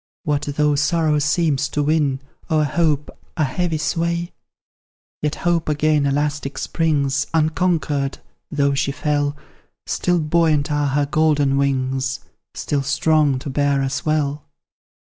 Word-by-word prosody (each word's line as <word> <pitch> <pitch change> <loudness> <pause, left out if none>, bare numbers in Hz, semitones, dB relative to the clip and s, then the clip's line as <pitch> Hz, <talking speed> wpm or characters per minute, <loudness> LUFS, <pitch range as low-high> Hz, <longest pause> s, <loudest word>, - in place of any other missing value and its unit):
What 145 -1 0 0.2
though 150 0 +3
sorrow 150 +1 +2
seems 145 -2 +1
to 150 - -1
win, 145 -3 +1 0.3
O'er 155 -2 +3
hope, 150 0 0 0.3
a 155 - +2
heavy 160 +4 -1
sway? 170 +3 -1 0.9
Yet 150 0 -1
Hope 170 -2 0
again 150 -1 +2
elastic 145 0 -1
springs, 140 -4 0
Unconquered, 155 -3 0 0.3
though 140 -2 +1
she 140 0 0
fell; 145 0 -1 0.5
Still 180 0 0
buoyant 155 -2 +2
are 145 -1 +1
her 145 +1 +1
golden 145 -2 +2
wings, 135 -1 0 0.3
Still 145 -1 -1
strong 145 0 +2
to 130 - -6
bear 140 0 +1
us 135 -1 -2
well. 150 -1 0
150 Hz, 125 wpm, -21 LUFS, 140-155 Hz, 0.9 s, though